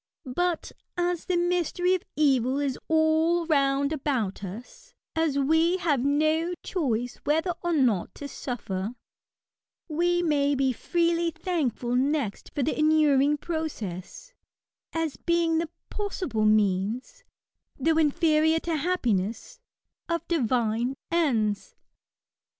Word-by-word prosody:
But, 355 Hz, -2 st, 0 dB, 0.3 s
as 350 Hz, -1 st, -1 dB
the 365 Hz, -, 0 dB
mystery 355 Hz, +1 st, +1 dB
of 370 Hz, -, 0 dB
evil 270 Hz, -3 st, +2 dB
is 280 Hz, -3 st, -1 dB
all 320 Hz, +2 st, +3 dB
round 280 Hz, -1 st, +2 dB
about 255 Hz, -10 st, -2 dB
us, 205 Hz, +6 st, -9 dB, 0.2 s
as 320 Hz, -3 st, +1 dB
we 320 Hz, +6 st, +3 dB
have 310 Hz, -8 st, +1 dB
no 310 Hz, +5 st, +1 dB
choice 245 Hz, -, -1 dB
whether 320 Hz, +5 st, 0 dB
or 345 Hz, -, -1 dB
not 245 Hz, -, +1 dB
to 285 Hz, -, -6 dB
suffer, 220 Hz, -5 st, -4 dB, 0.9 s
we 350 Hz, +2 st, +1 dB
may 290 Hz, -3 st, +2 dB
be 265 Hz, -1 st, +1 dB
freely 340 Hz, +4 st, +1 dB
thankful 310 Hz, -, -2 dB
next 270 Hz, -5 st, 0 dB
for 285 Hz, -, 0 dB
the 310 Hz, -, 0 dB
inuring 295 Hz, -2 st, +4 dB
process, 315 Hz, -, -5 dB, 0.6 s
as 325 Hz, -3 st, -2 dB
being 335 Hz, -1 st, +1 dB
the 330 Hz, -1 st, -2 dB, 0.2 s
possible 365 Hz, -, -2 dB
means, 215 Hz, -, +1 dB, 0.5 s
though 320 Hz, +4 st, +2 dB
inferior 320 Hz, 0 st, +3 dB
to 330 Hz, -2 st, -1 dB
hap 360 Hz, +5 st, -1 dB
piness, 220 Hz, -, -1 dB, 0.5 s
of 335 Hz, 0 st, -2 dB
divine 245 Hz, -4 st, 0 dB, 0.2 s
ends. 230 Hz, -12 st, 0 dB
305 Hz, 115 wpm, -27 LUFS, 250-335 Hz, 0.9 s, inuring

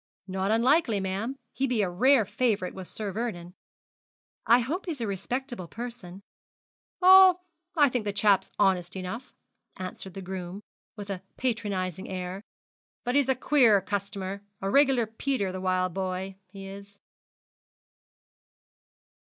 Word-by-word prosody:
'Not 190 Hz, 0 st, -2 dB
unlikely, 235 Hz, 0 st, +3 dB
ma'am 195 Hz, +8 st, -3 dB, 0.2 s
he 270 Hz, -, 0 dB
be 240 Hz, -5 st, +1 dB
a -, -, +1 dB
rare 250 Hz, +5 st, +4 dB
favourite 210 Hz, -3 st, 0 dB
with 190 Hz, -2 st, -8 dB
Sir 210 Hz, -2 st, -5 dB
Vernon.' 180 Hz, -5 st, -4 dB, 0.9 s
'I 235 Hz, +2 st, +7 dB
hope 330 Hz, +11 st, -3 dB
he's 315 Hz, -6 st, -3 dB
a 230 Hz, -, -1 dB
respectable 240 Hz, +1 st, -4 dB
person.' 205 Hz, -4 st, -8 dB, 0.8 s
'Oh, 375 Hz, -1 st, +8 dB, 0.4 s
I 290 Hz, -2 st, +7 dB
think 245 Hz, -4 st, -2 dB
the 205 Hz, -, 0 dB
chap's 205 Hz, -1 st, +3 dB
honest 185 Hz, -2 st, +2 dB
enough,' 190 Hz, +7 st, -6 dB, 0.5 s
answered 185 Hz, 0 st, -7 dB
the 195 Hz, -, -6 dB
groom, 185 Hz, 0 st, -6 dB, 0.4 s
with 205 Hz, -2 st, -6 dB
a 185 Hz, -2 st, -4 dB, 0.2 s
patronising 200 Hz, -7 st, -2 dB
air; 185 Hz, 0 st, -5 dB, 0.6 s
'but 245 Hz, -, -1 dB
he's 280 Hz, -1 st, +3 dB
a 265 Hz, -, +4 dB
queer 250 Hz, -7 st, +4 dB
customer 200 Hz, 0 st, -4 dB, 0.2 s
a 195 Hz, 0 st, -2 dB
reg'lar 270 Hz, -3 st, +4 dB
Peter 220 Hz, -2 st, -2 dB
the 185 Hz, 0 st, -5 dB
wild 185 Hz, -1 st, 0 dB
boy, 190 Hz, 0 st, -3 dB
he 195 Hz, +1 st, -10 dB
is.' 200 Hz, +1 st, -11 dB
200 Hz, 135 wpm, -27 LUFS, 190-245 Hz, 0.9 s, Oh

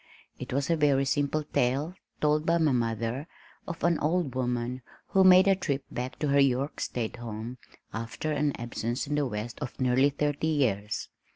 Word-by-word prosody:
It -, -, -6 dB
was 140 Hz, +4 st, 0 dB
a -, -, +4 dB
very 140 Hz, -3 st, +3 dB
simple 145 Hz, +2 st, 0 dB
tale 140 Hz, +4 st, 0 dB, 0.3 s
(told 150 Hz, 0 st, +3 dB
by 170 Hz, +1 st, +2 dB
my 160 Hz, -3 st, +3 dB
mother) 115 Hz, +3 st, -1 dB, 0.4 s
of 170 Hz, -2 st, -6 dB
an 170 Hz, -1 st, +3 dB
old 155 Hz, -3 st, 0 dB
woman, 125 Hz, 0 st, -2 dB, 0.3 s
who 190 Hz, -, +4 dB
made 185 Hz, +1 st, +8 dB
a 195 Hz, -, +5 dB
trip 140 Hz, -7 st, -2 dB
back 125 Hz, +1 st, -4 dB
to 150 Hz, -, -1 dB
her 140 Hz, 0 st, +4 dB
York 135 Hz, +1 st, +2 dB
state 120 Hz, -1 st, -3 dB
home 115 Hz, +1 st, -6 dB, 0.3 s
after 115 Hz, +7 st, -4 dB
an 150 Hz, -1 st, 0 dB
absence 120 Hz, +2 st, -3 dB
in 145 Hz, -, -3 dB
the 145 Hz, -1 st, +1 dB
West 110 Hz, +1 st, -5 dB
of 145 Hz, -4 st, -6 dB
nearly 130 Hz, +2 st, +4 dB
thirty 145 Hz, +2 st, -1 dB
years. 110 Hz, -9 st, 0 dB
140 Hz, 180 wpm, -28 LUFS, 120-150 Hz, 0.4 s, made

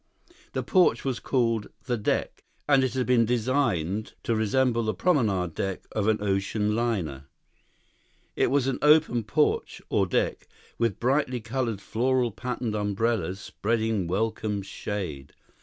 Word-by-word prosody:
The -, -, -1 dB
porch 185 Hz, -6 st, +3 dB
was 130 Hz, -3 st, -1 dB
called 115 Hz, -5 st, 0 dB, 0.2 s
the 125 Hz, -, 0 dB
"deck," 105 Hz, -3 st, -2 dB, 0.2 s
and 140 Hz, -2 st, +5 dB
it 130 Hz, 0 st, -1 dB
had 130 Hz, -1 st, +1 dB
been 125 Hz, -2 st, +4 dB
designed 110 Hz, -, 0 dB
to 115 Hz, -, 0 dB
resemble 115 Hz, +2 st, +2 dB
the 110 Hz, -1 st, -1 dB
promenade 105 Hz, -, +1 dB
deck 95 Hz, +2 st, -3 dB
of 105 Hz, -1 st, -1 dB
an 110 Hz, -1 st, +3 dB
ocean 105 Hz, +2 st, 0 dB
liner. 95 Hz, -, -1 dB, 1.1 s
It -, -, +2 dB
was 140 Hz, 0 st, +2 dB
an 135 Hz, -1 st, -1 dB
open 150 Hz, -6 st, +4 dB
porch, 150 Hz, +7 st, 0 dB
or -, -, +2 dB
deck, -, -, -1 dB, 0.3 s
with 115 Hz, -4 st, 0 dB
brightly 130 Hz, 0 st, +1 dB
colored 115 Hz, -2 st, -2 dB
floral 125 Hz, +2 st, +1 dB
patterned 125 Hz, 0 st, -3 dB
umbrellas 105 Hz, -2 st, -1 dB
spreading 110 Hz, -2 st, -1 dB
welcome 105 Hz, +1 st, -1 dB
shade. 95 Hz, -8 st, -5 dB
115 Hz, 140 wpm, -27 LUFS, 105-125 Hz, 1.1 s, and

